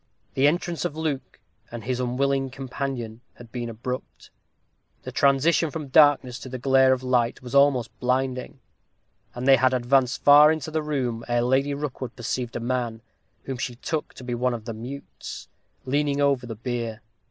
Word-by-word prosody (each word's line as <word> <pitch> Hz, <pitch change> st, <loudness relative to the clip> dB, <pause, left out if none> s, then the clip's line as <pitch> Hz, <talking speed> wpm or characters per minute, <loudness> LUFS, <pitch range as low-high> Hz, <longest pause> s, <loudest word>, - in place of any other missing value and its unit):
The 135 Hz, +2 st, +4 dB
entrance 170 Hz, +2 st, -1 dB
of 165 Hz, -3 st, -3 dB
Luke 145 Hz, -5 st, -3 dB, 0.3 s
and 120 Hz, -1 st, -7 dB
his 125 Hz, 0 st, -2 dB
unwilling 135 Hz, +2 st, 0 dB
companion 130 Hz, -3 st, -5 dB
had 120 Hz, -2 st, -14 dB
been 120 Hz, -2 st, -4 dB
abrupt. 125 Hz, +3 st, -7 dB, 0.7 s
The -, -, -6 dB
transition 145 Hz, +4 st, +3 dB
from 150 Hz, -2 st, -6 dB
darkness 135 Hz, -3 st, +4 dB
to 130 Hz, -, -9 dB
the 130 Hz, -, -5 dB
glare 130 Hz, +1 st, +4 dB
of 130 Hz, 0 st, 0 dB
light 125 Hz, -1 st, +1 dB
was 125 Hz, +1 st, -8 dB
almost 140 Hz, -5 st, +4 dB
blinding, 130 Hz, +1 st, -1 dB, 0.8 s
and 125 Hz, +2 st, -4 dB
they 135 Hz, -1 st, +8 dB
had 130 Hz, +1 st, +3 dB
advanced 125 Hz, +1 st, +1 dB
far 145 Hz, +1 st, +8 dB
into 155 Hz, -1 st, -3 dB
the 155 Hz, 0 st, 0 dB
room 130 Hz, -6 st, -2 dB
ere 120 Hz, 0 st, +1 dB
Lady 135 Hz, +3 st, +1 dB
Rookwood 135 Hz, -4 st, -5 dB
perceived 120 Hz, 0 st, -3 dB
a -, -, -1 dB
man, 120 Hz, -2 st, -2 dB, 0.4 s
whom 130 Hz, -2 st, -5 dB
she 120 Hz, -, -3 dB
took 155 Hz, +5 st, -4 dB
to -, -, -10 dB
be 125 Hz, -1 st, -4 dB
one 125 Hz, +1 st, 0 dB
of 110 Hz, -2 st, -9 dB
the 115 Hz, -, -4 dB
mutes, 125 Hz, +6 st, -8 dB, 0.4 s
leaning 145 Hz, +1 st, 0 dB
over 140 Hz, -3 st, +2 dB
the 115 Hz, -, -5 dB
bier. 115 Hz, -1 st, -4 dB
130 Hz, 175 wpm, -25 LUFS, 120-140 Hz, 0.8 s, they